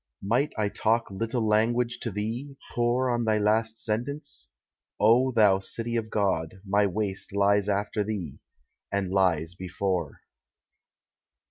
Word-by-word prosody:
Might 125 +9 +1
I 105 -1 +1
talk 115 +1 0
little 115 +3 -1
language 115 +3 +2
to 115 - -3
thee, 115 +7 -4 0.2
pore 125 +2 +1
On 120 0 0
thy 110 -1 +2
last 110 +2 +1
silence? 120 - -3 0.5
O 120 +5 +5
thou 105 -5 +5
city 115 +4 -4
of 110 -1 -1
God, 95 -5 -1
My 100 +1 +3
waste 100 0 -2
lies 100 0 +3
after 105 +1 0
thee, 100 -9 -5 0.5
and 100 -2 -1
lies 90 -4 +2
before. 90 -3 -3
105 Hz, 130 wpm, -27 LUFS, 100-115 Hz, 0.5 s, O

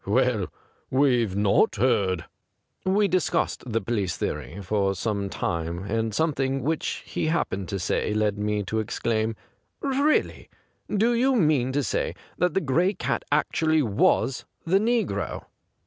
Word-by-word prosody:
Well, 115 -2 +1 0.4
we've 125 -7 +2
not 100 +1 +3
heard.' 100 -7 +1 0.6
We 200 +2 +3
discussed 185 -3 0
the 115 +1 +1
police 100 -7 -1
theory 95 - -4
for 100 0 0
some 100 +2 -1
little 100 - -7
time, 85 +2 -2
and 110 +2 -1
something 135 -1 0
which 160 +3 -2
he - - -2
happened 100 - -1
to 100 - -2
say 95 +3 -1
led 105 -1 +1
me 105 0 -1
to 110 +3 -2
exclaim: 110 +1 -1 0.3
' - - -50
Really! 280 +2 +1 0.4
Do 225 +4 +2
you 255 +3 +3
mean 150 - +3
to 145 +1 +1
say - - -1 0.2
that 180 0 +1
the 195 - +3
Gray 170 +8 +2
Cat - - -2
actually 155 +1 +2
was 115 +3 +2 0.2
the 185 +4 +3
negro 215 - -1
120 Hz, 145 wpm, -25 LUFS, 100-160 Hz, 0.6 s, not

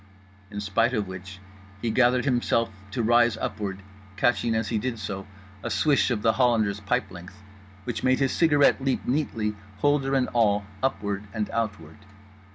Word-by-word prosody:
In 105 - -6
spite 115 +5 +1
of 105 -3 -1
which 95 +1 -8 0.4
he 115 +1 -1
gathered 125 +2 +3
himself 120 -3 +1 0.2
to 115 +3 -2
rise 120 0 +4
upward, 100 -3 -4 0.3
catching 120 -2 +2
as 110 -2 -1
he 110 - 0
did 125 +1 -3
so 95 -2 -5 0.3
a 115 - -4
swish 125 +9 +2
of 110 -4 -1
The 115 - +4
Hollander's 110 -5 +2
pipe 100 -1 -1
length 90 +1 -11 0.4
which 115 -1 -4
made 130 0 +3
his 135 -1 +1
cigarette 145 -4 +3
leap 135 -1 0
neatly, 115 -6 -1 0.2
holder 140 +2 +2
and 130 -2 +2
all, 105 -4 +2 0.2
upward 100 -4 -2
and 110 -1 -2
outward. 105 -7 -3
115 Hz, 165 wpm, -26 LUFS, 100-125 Hz, 0.4 s, rise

